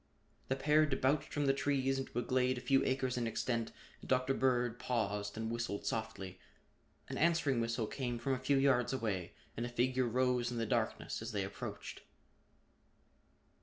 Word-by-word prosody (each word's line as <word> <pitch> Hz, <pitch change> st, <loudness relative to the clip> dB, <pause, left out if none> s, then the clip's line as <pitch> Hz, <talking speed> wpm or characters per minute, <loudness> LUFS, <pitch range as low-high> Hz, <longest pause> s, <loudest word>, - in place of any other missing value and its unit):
The 135 Hz, -, +1 dB
pair 150 Hz, +3 st, +4 dB
debouched 135 Hz, +1 st, +1 dB
from 145 Hz, -1 st, 0 dB
the 135 Hz, -, +4 dB
trees 135 Hz, -1 st, +1 dB
into 135 Hz, -3 st, -5 dB
a 120 Hz, -, +1 dB
glade 130 Hz, +1 st, +2 dB
a -, -, -5 dB
few 135 Hz, +1 st, +3 dB
acres 130 Hz, -1 st, 0 dB
in 120 Hz, -1 st, 0 dB
extent 115 Hz, 0 st, -1 dB, 0.3 s
and -, -, -12 dB
Dr. 130 Hz, +1 st, +2 dB
Bird 125 Hz, -3 st, +1 dB
paused 105 Hz, -4 st, -1 dB
and 110 Hz, 0 st, -2 dB
whistled 115 Hz, -3 st, -3 dB
softly. 110 Hz, -4 st, -3 dB, 0.7 s
An -, -, -4 dB
answering 160 Hz, -6 st, +3 dB
whistle 115 Hz, 0 st, 0 dB
came 120 Hz, +1 st, -3 dB
from 130 Hz, +3 st, -1 dB
a 130 Hz, -, -1 dB
few 135 Hz, +2 st, +2 dB
yards 135 Hz, -2 st, +3 dB
away 100 Hz, -9 st, -2 dB, 0.2 s
and 115 Hz, -, -3 dB
a 120 Hz, -, -2 dB
figure 125 Hz, +1 st, +1 dB
rose 125 Hz, 0 st, +1 dB
in 120 Hz, -, -4 dB
the 115 Hz, -, 0 dB
darkness 115 Hz, -1 st, -1 dB
as 110 Hz, 0 st, -5 dB
they 100 Hz, -2 st, 0 dB
approached. 95 Hz, +1 st, -6 dB
125 Hz, 175 wpm, -35 LUFS, 115-135 Hz, 0.7 s, pair